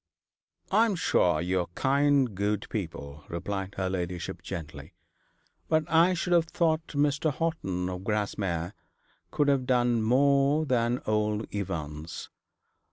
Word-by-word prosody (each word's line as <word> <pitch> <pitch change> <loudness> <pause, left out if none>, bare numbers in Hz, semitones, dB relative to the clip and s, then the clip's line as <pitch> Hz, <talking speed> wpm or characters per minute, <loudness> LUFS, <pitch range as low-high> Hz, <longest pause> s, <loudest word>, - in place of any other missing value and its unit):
'I 225 - +5
am 205 - -1
sure 85 - +2
you 90 +2 0
are 90 - -2
kind 140 -3 +2
good 100 +1 -1
people,' 75 -7 -5
replied 95 +3 -4
her 95 -1 -1
ladyship 90 -2 -4
gently; 80 +1 -8 0.7
'but 155 0 +3
I 170 +3 +4
should 175 +1 -1
have 170 -1 +4
thought 160 -1 0
Mr. 145 +1 +1
Horton, 135 - -2
of 90 0 -5
Grasmere, 100 -4 -2 0.6
could 145 - +1
have 135 -3 +2
done 120 -2 +2
more 140 +5 +3
than 120 -2 0
old 105 0 0
Evans. 80 -6 -5
105 Hz, 130 wpm, -28 LUFS, 90-145 Hz, 0.7 s, I